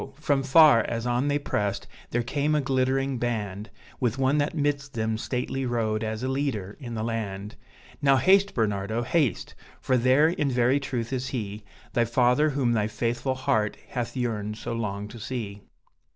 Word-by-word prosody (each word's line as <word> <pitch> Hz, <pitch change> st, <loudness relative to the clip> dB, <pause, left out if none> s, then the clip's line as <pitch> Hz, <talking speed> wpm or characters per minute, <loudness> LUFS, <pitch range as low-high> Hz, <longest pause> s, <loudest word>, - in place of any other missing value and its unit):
from 145 Hz, -2 st, +1 dB
far, 135 Hz, -3 st, +7 dB
as 115 Hz, 0 st, -3 dB
on 120 Hz, +3 st, +1 dB
they 145 Hz, 0 st, +2 dB
pressed, 105 Hz, -8 st, -2 dB, 0.2 s
there 120 Hz, 0 st, 0 dB
came 145 Hz, +5 st, 0 dB
a -, -, +3 dB
glittering 135 Hz, 0 st, 0 dB
band, 105 Hz, -4 st, -3 dB, 0.3 s
With 125 Hz, -1 st, 0 dB
one 135 Hz, +2 st, +2 dB
that 145 Hz, +3 st, 0 dB
midst 145 Hz, -2 st, -1 dB
them 110 Hz, -1 st, 0 dB
stately 125 Hz, +3 st, -3 dB
rode, 115 Hz, -3 st, -1 dB
as 110 Hz, +1 st, -3 dB
a -, -, 0 dB
leader 130 Hz, -8 st, -2 dB
in 120 Hz, -5 st, -6 dB
the 110 Hz, -, -2 dB
land; 105 Hz, -2 st, -4 dB, 0.5 s
"Now 135 Hz, -1 st, +5 dB
haste, 195 Hz, +6 st, +4 dB
Bernardo, 110 Hz, 0 st, 0 dB
haste! 135 Hz, -, 0 dB, 0.3 s
for 130 Hz, -, +1 dB
there, 130 Hz, +6 st, +4 dB
in 150 Hz, -4 st, 0 dB
very 125 Hz, +2 st, +3 dB
truth, 130 Hz, -3 st, -3 dB
is 130 Hz, 0 st, -2 dB
he, 105 Hz, -4 st, -4 dB, 0.3 s
The 120 Hz, -1 st, +2 dB
father 125 Hz, +5 st, +3 dB
whom 135 Hz, -4 st, +1 dB
thy 105 Hz, -2 st, +1 dB
faithful 120 Hz, +4 st, -1 dB
heart 130 Hz, -6 st, 0 dB
hath 120 Hz, +1 st, -4 dB
yearned 105 Hz, -4 st, -2 dB
so 115 Hz, -, -5 dB
long 105 Hz, -3 st, -3 dB
to 115 Hz, +2 st, -10 dB
see." 105 Hz, -4 st, -5 dB
120 Hz, 175 wpm, -26 LUFS, 110-135 Hz, 0.5 s, far